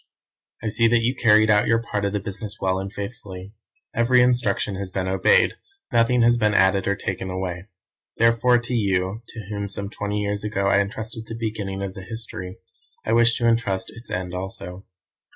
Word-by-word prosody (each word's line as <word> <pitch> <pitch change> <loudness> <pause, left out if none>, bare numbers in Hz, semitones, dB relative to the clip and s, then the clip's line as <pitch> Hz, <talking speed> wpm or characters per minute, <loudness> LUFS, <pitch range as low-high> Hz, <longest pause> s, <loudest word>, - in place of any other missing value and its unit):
"I 110 - 0
see 115 +2 +3
that 115 0 +3
you 120 +3 +2
carried 110 -3 +4
out 105 0 +4
your 115 0 +3
part 105 -3 -3
of 100 - 0
the 105 - -1
business 100 +1 -6
well 95 0 0
and 95 0 -5
faithfully. 100 -3 -8 0.4
Every 125 +2 +4
instruction 120 -5 +1
has 100 -1 -5
been 95 0 -2
obeyed, 95 0 +4 0.4
nothing 115 +1 +4
has 120 +1 +5
been 105 -2 +2
added 95 0 +3
or 100 - +2
taken 95 -1 -4
away. 90 0 -4 0.5
Therefore, 115 +2 +4
to 120 +1 -4
you, 100 -1 0
to 110 -4 -9
whom 100 -1 -3
some 100 0 -4
twenty 105 0 -3
years 100 0 -2
ago 105 -2 -1
I 100 0 +4
entrusted 110 +3 -4
the 115 - -6
beginning 105 -4 -4
of 95 -1 -4
the 95 - -8
history, 95 -3 -7 0.5
I 110 - +1
wish 115 0 +4
to 120 - +1
entrust 115 -5 0
its 115 +2 -11
end 90 -1 -3
also. 90 0 -6
105 Hz, 190 wpm, -23 LUFS, 95-115 Hz, 0.5 s, has